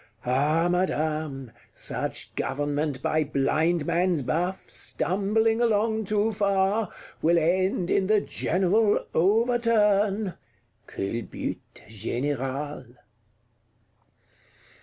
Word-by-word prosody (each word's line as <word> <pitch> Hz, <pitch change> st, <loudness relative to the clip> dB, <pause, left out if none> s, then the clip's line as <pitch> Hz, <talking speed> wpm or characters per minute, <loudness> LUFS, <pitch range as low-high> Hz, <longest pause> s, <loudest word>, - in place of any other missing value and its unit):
—Ah 150 Hz, +7 st, +2 dB
Madame, 155 Hz, -7 st, -1 dB, 0.2 s
such -, -, -3 dB
Government 145 Hz, 0 st, -2 dB
by 155 Hz, -1 st, +2 dB
Blindman's 160 Hz, +3 st, +1 dB
buff, 175 Hz, +9 st, -2 dB
stumbling 220 Hz, +5 st, 0 dB
along 220 Hz, -1 st, +1 dB
too 210 Hz, +2 st, +1 dB
far, 200 Hz, 0 st, +1 dB, 0.3 s
will 170 Hz, +2 st, +4 dB
end 180 Hz, +2 st, +1 dB
in 190 Hz, -1 st, +2 dB
the 215 Hz, 0 st, +4 dB
General 200 Hz, +3 st, +1 dB
Overturn 210 Hz, -1 st, +2 dB, 0.5 s
(culbute 110 Hz, +4 st, -4 dB, 0.2 s
générale)." 130 Hz, +4 st, -4 dB
175 Hz, 75 wpm, -26 LUFS, 145-205 Hz, 0.5 s, will